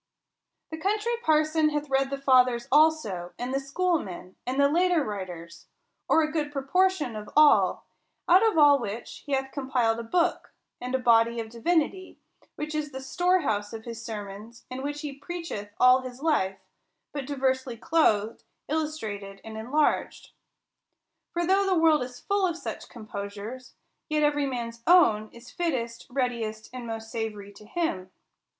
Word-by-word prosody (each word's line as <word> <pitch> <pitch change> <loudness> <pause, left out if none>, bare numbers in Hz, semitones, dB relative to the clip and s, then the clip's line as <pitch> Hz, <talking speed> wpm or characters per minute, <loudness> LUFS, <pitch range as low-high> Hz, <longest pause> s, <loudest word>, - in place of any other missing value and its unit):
The 320 - -5
Country 425 +6 0
Parson 310 -2 +3
hath 295 0 -2
read 270 0 +1
the 275 - -3
fathers 255 -3 +3
also, 275 - +2
and 250 +2 -4
the 270 - +1
schoolmen, 275 - -2
and 260 +2 -1
the 280 - +6
later 345 +1 +2
writers, 180 -6 -7 0.4
or 320 - +5
a 310 - -2
good 300 -2 -2
proportion 295 -1 +1
of 210 -1 -7
all: 305 -1 +5 0.4
out 360 +2 +7
of 445 -6 +2
all 290 -2 +7
which 225 0 -6
he 285 - -2
hath 265 0 -1
compiled 250 -5 0
a - - -4
book, 340 +9 0 0.3
and 250 +1 -2
body 230 0 +4
of 225 -1 -5
divinity, 340 +9 -1 0.4
w^hich 305 +1 -4
is 305 -1 -2
the 265 - -6
storehouse 265 - 0
of 225 0 -8
his 230 -1 -7
sermons, 210 +1 -8
and 255 +1 -5
which 290 +1 -4
he 295 -3 -5
preacheth 320 -10 -6
all 255 +1 +6
his 255 -1 -8
life, 270 -12 +1 0.6
but 280 -3 -4
diversely 260 -3 -1
clothed, 225 -7 +1 0.3
illustrated, 220 -11 -3
and 220 0 -9
enlarged. 255 +8 0 1.0
For 345 0 -1
though 390 +2 +3
the 375 -2 +2
world 320 -3 +4
is 250 0 -6
full 400 -1 +1
of 340 -1 -3
such - - -7
composures, 215 +3 -8 0.3
yet 305 0 +1
every 290 -1 +2
man's 235 -3 -5
own 225 -12 +5
is 235 +1 -14
fittest, 240 -9 -3
readiest, 235 -4 -3
and 250 -2 -6
most 225 0 -6
savory 210 -3 -4
to 210 - -15
him. 215 - -2
265 Hz, 155 wpm, -27 LUFS, 225-310 Hz, 1.0 s, out